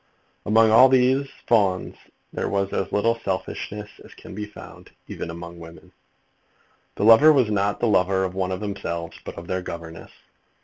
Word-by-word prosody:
Among 110 +1 +4
all 130 +4 +7
these 130 +2 +2 0.2
Fawns 100 -5 +1 0.4
there - - -3
was 100 -1 -1
as 95 - -2
little 115 +3 +1
selfishness 100 +2 -4 0.2
as - - -16
can - - -12
be 105 +2 -5
found, 105 - -13 0.2
even - - -6
among 85 +1 -9
women. 85 0 -13 1.0
The - - -3
lover 115 +8 +8
was 130 -7 +2
not 100 0 0
the 120 - +1
lover 95 -2 +2
of 95 -1 -3
one 95 -1 -2
of 95 - -4
themselves, 85 -5 -5
but - - -9
of 85 - -8
their 95 +1 -3
governess. 85 -2 -9
100 Hz, 170 wpm, -23 LUFS, 90-110 Hz, 1.0 s, lover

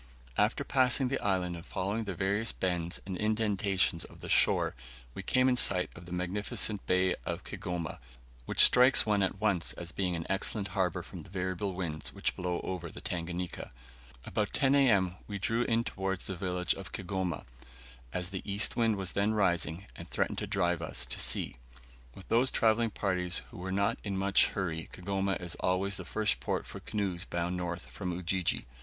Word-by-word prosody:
After - - +2
passing 130 0 +2
the 135 - 0
island 90 -3 +1
and 85 - -8
following 100 +6 -2
the 100 -3 -4
various 100 +5 +1
bends 85 -2 -1
and 95 -1 -4
indentations 100 -4 +1
of - - -13
the - - -7
shore, - - +4 0.4
we - - -5
came 130 +6 +3
in 130 - +4
sight 90 -6 +5
of 85 - -12
the - - -10
magnificent 95 +3 0
bay 90 0 +3
of - - -4
Kigoma, 85 -1 -4 0.5
which - - +7
strikes 125 +1 +7
one 105 -2 +2
at 95 0 0
once 100 -5 +1
as 85 0 -7
being 90 -2 -1
an 80 -1 -4
excellent 100 +1 -1
harbor 95 -3 0
from - - -8
the - - -14
variable 95 0 -2
winds 80 -4 -3
which - - -1
blow 90 -1 -2
over 90 -3 -4
the - - -9
Tanganika. 90 +1 -4 0.5
About 105 -2 -1
10 135 0 +3
A.M. 100 -10 +4
we 100 - -4
drew 115 +4 +1
in 115 0 +2
towards 95 -3 -3
the 95 - -3
village 90 0 0
of - - -8
Kigoma, 95 -1 -3 0.7
as 90 +3 -3
the 95 - -4
east 100 +1 0
wind 115 -2 +3
was 95 -2 -4
then 105 +2 +1
rising, 90 -2 +1
and - - -9
threatened - - 0
to - - -3
drive 85 -3 +1
us 80 - -3
to - - -4
sea. - - +2 0.6
With 95 - -12
those 125 +3 +4
travelling 115 -1 +3
parties 90 -4 -1
who 90 - -8
are 95 - -3
not 100 +1 +1
in 100 -2 -2
much 95 +1 +4
hurry 85 -5 -3
Kigoma 95 +1 -1
is 90 -2 -3
always 95 +1 +1
the 95 - -7
first 105 +3 0
port - - -2
for - - -8
canoes 95 -5 -2
bound 85 -1 -2
north 90 0 -3
from 90 -3 -5
Ujiji. 90 +1 0
95 Hz, 185 wpm, -31 LUFS, 90-105 Hz, 0.7 s, which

